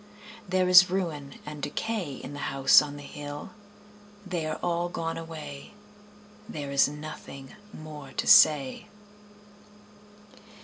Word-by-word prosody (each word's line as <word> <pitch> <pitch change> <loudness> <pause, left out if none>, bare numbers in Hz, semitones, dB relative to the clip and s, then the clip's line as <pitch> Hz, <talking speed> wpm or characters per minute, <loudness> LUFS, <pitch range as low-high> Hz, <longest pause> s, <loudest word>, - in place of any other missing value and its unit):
There 185 0 +2
is 180 0 +8
ruin 160 -7 -3
and 150 -1 -8
decay 175 0 -3
In 135 - -9
the 145 - -4
House 135 0 +7
on 145 -1 -6
the 145 - -10
Hill 145 0 -8 0.7
They 175 -4 -3
are 155 - -3
all 175 0 -1
gone 165 -1 -4
away, 165 +1 -9 0.7
There 145 -9 -6
is 140 - +4
nothing 150 -2 -9 0.2
more 150 -5 -10
to - - -2
say. 150 - +5
150 Hz, 125 wpm, -27 LUFS, 145-175 Hz, 0.7 s, is